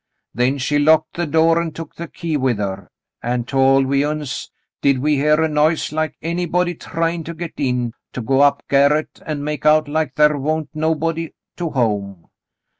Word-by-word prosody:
Then 125 +4 +1
she 145 +2 0
locked 155 +1 +3
the 175 -1 -2
door 165 +2 +3
an' 165 -2 -4
took 165 -1 -8
the 170 - -7
key 165 -1 -4
with 130 -5 +1
her, 100 -1 -4 0.3
an' 120 0 -1
tol' 135 +2 +3
we 140 +1 +1
uns 150 -2 -3 0.3
did 140 -1 +3
we 145 +3 +1
hear 150 +2 +3
a - - +3
noise 155 +1 +1
like 155 0 -2
anybody 175 +1 0
tryin' 165 0 -2
to 170 - -6
get 170 0 -6
in, 125 -4 -1 0.2
to 125 - -4
go 135 +3 +1
up 140 0 +3
garret 140 +2 +2
an' 150 -2 -3
make 150 0 -4
out 155 0 +4
like 150 -2 -1
thar 150 -1 +4
wa'n't 155 +1 -1
nobody 160 +1 -1 0.2
to 175 -2 -2
home. 100 - -2
150 Hz, 185 wpm, -20 LUFS, 135-160 Hz, 0.3 s, out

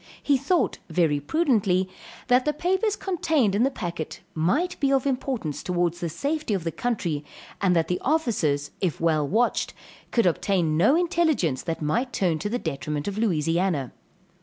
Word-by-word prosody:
He 285 - +3
thought 290 +6 +1
very 160 -3 +2
prudently 195 - +1 0.4
that 250 0 +4
the 300 - +1
papers 380 +7 0
contained 320 - +1
in 205 - +1
the 265 - +4
packet 170 - -5
might 265 - 0
be 275 -2 +2
of 270 -1 +2
importance 255 - -2
towards 175 -1 -1
the 170 - -2
safety 280 - -1
of 185 - -3
the 165 - -2
country 170 -10 -2 0.4
and 185 -3 +3
that 165 -1 +2
the 180 - -1
officers 185 - 0
if 180 -5 -1
well 155 -3 +2
watched 230 +9 +1 0.3
could 230 - +2
obtain 175 -2 +1
no 205 - +4
intelligence 320 - +1
that 165 -2 -4
might 240 - 0
turn 170 -5 +1
to 205 - -3
the 240 - 0
detriment 150 - -3
of 200 +1 -3
Louisiana. 165 - +1
195 Hz, 165 wpm, -25 LUFS, 165-270 Hz, 0.4 s, that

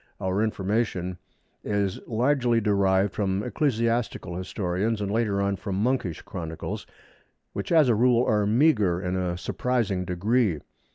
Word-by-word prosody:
Our 95 +2 0
information 95 -4 -1 0.4
is 100 -2 -1
largely 120 0 +2
derived 100 -2 +2
from 100 -1 -1
ecclesiastical 115 - -1
historians 95 +4 -2
and, 100 -1 -2
later 105 -3 +1
on, 100 0 0
from 100 -1 -4
monkish 105 -5 -1
chronicles, 80 -2 -6 0.7
which - - -4
as 160 -4 +6
a 120 - +4
rule 120 +2 +3
are 105 -1 +2
meagre 110 - +3
in 90 0 -2
a 90 -2 -1
surprising 105 0 -1
degree. 100 +2 +1
105 Hz, 130 wpm, -26 LUFS, 95-115 Hz, 0.7 s, as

